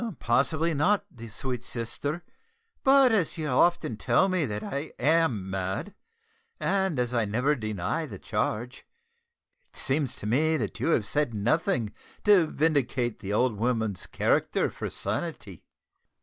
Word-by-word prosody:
"Possibly 155 +7 +2
not, 200 +8 +2 0.2
sweet 125 +3 -4
sister, 140 +8 -4 0.6
but 270 -2 +6
as 200 -8 +1
you 155 -1 -2
often 130 -3 +2
tell 120 - +3
me 180 -6 +1
that 105 -1 -4
I 140 +3 -4
am 140 - +2
mad, 95 - -3 0.7
and 190 -5 0
as 125 0 -1
I 115 -2 +2
never 125 +8 +1
deny 110 -7 -2
the - - -8
charge, 120 +4 -3 0.9
it - - -26
seems 135 -1 0
to - - -8
me 155 +9 +2
that 105 -7 -4
you - - -1
have 125 -10 +2
said 145 0 0
nothing 120 - 0 0.3
to 200 -6 +5
vindicate 135 -7 0
the 100 0 -4
old 115 0 +2
woman's 110 -5 -1
character - - +1
for - - -5
sanity." 110 - -4
130 Hz, 140 wpm, -27 LUFS, 110-160 Hz, 0.9 s, but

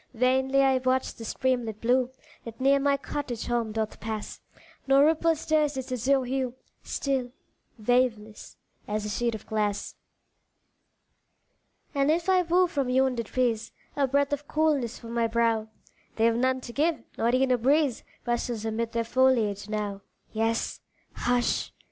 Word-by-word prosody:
Vainly 265 +3 +3
I 265 -1 +3
watch 255 0 0
the 230 - -10
streamlet 240 -3 -1
blue 250 +2 +2 0.3
That 230 +1 -9
near 275 +1 +4
my 280 0 +2
cottage 265 -4 -4
home 235 -2 -1
doth 220 0 -3
pass, 215 -1 -5 0.5
No 270 +1 +6
ripple 325 +2 +3
stirs 305 -2 +1
its 260 -1 -5
azure 255 +2 +1
hue, 255 -1 -2 0.3
Still 265 -3 -2 0.5
waveless, 220 -2 0 0.3
as 210 0 -2
a - - -3
sheet 235 +2 -1
of 215 - -9
glass 210 -2 -1 2.0
And 280 0 +2
if 335 +3 +1
I 370 -1 +5
woo 355 +1 +3
from 285 -7 -2
yonder 255 -1 +2
trees 230 0 -1 0.2
A 280 -1 +2
breath 280 +2 +1
of 290 0 -4
coolness 295 -7 +1
for 230 - -11
my 235 0 +1
brow, 225 -1 +1 0.5
They've 230 +1 +3
none 260 +2 +1
to 235 - -9
give 305 -2 0 0.2
not 235 +2 +2
e'en 260 0 +2
a 250 - +4
breeze 275 +1 +2 0.2
Rustles 240 -2 -2
amid 225 +1 -2
their 230 0 0
foliage 230 -5 +2
now; 205 -2 -3 0.3
Yes, 225 +1 -1 0.3
hush! 245 0 0
250 Hz, 150 wpm, -27 LUFS, 225-275 Hz, 2.0 s, No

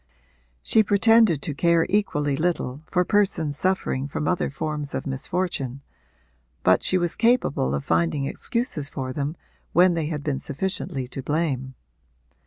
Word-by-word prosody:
She 220 - +4
pretended 210 -5 +4
to 150 - -2
care 170 +2 +3
equally 150 -9 0
little 155 -4 -2
for 180 0 +1
persons 185 -8 +1
suffering 155 -6 0
from 145 +1 -3
other 180 - 0
forms 150 +1 -4
of - - -3
misfortune, 140 -1 -2 0.8
but 95 - +4
she 185 - +2
was 175 -1 0
capable 230 - +2
of 70 - -4
finding 85 - +1
excuses 175 - -1
for 130 -2 -5
them 145 +3 -3 0.4
when 180 +1 +5
they 165 -3 -1
had 150 -2 -4
been 140 -3 -1
sufficiently 145 -4 -3
to 135 - -6
blame. 135 -3 -2
150 Hz, 145 wpm, -24 LUFS, 135-180 Hz, 0.8 s, when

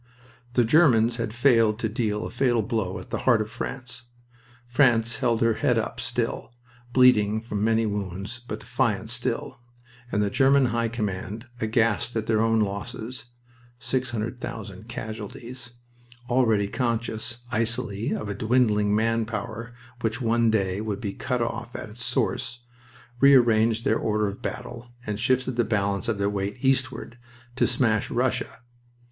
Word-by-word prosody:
The 125 - +4
Germans 120 -5 +4
had 115 -2 -2
failed 115 -3 +4
to 115 - -1
deal 105 -2 -1
a - - -6
fatal 120 -4 +2
blow 100 -4 -2
at - - -10
the - - -1
heart 120 -4 +4
of 110 0 -3
France. 125 -2 -6 0.6
France 120 -2 +3
held 120 -4 +1
her 115 -1 +4
head - - +1
up - - -2
still, 120 - -3 0.4
bleeding 110 -5 +5
from 105 -2 -3
many 115 0 +3
wounds, 100 +2 -4
but - - -5
defiant - - 0
still; - - -3 0.5
and 105 - +1
the 100 - -1
German 135 +1 +4
High 115 0 +1
Command, 105 0 -4
aghast 115 +1 +1
at 110 -1 -1
their 110 -1 +2
own 115 -1 +3
losses 110 +4 -4 0.5
six 130 0 -2
hundred 115 +1 -3
thousand 110 -3 -7
casualties 115 +2 -7 0.5
already 115 -5 +3
conscious, 115 0 -2
icily, 115 -2 -1
of 105 - -2
a 100 - -2
dwindling 105 -2 +2
man 115 +1 +2
power 115 +1 -5 0.3
which 115 0 -1
one 115 -1 +2
day 100 -2 0
would 105 -2 -3
be 100 -3 -4
cut 125 -3 -1
off 120 +1 -5
at 115 - -6
its 115 +2 -6
source, 120 +1 -1 0.6
rearranged 115 -4 +5
their - - +2
order 105 -1 +1
of 100 0 -6
battle 120 -1 -6
and 105 0 -3
shifted 130 +1 +1
the 120 - +4
balance 100 -3 0
of 115 -3 0
their 100 0 +1
weight 100 +2 -2
eastward, 130 -2 0 0.4
to - - +3
smash 110 -6 +1
Russia. 120 -1 -1
115 Hz, 155 wpm, -25 LUFS, 105-120 Hz, 0.6 s, bleeding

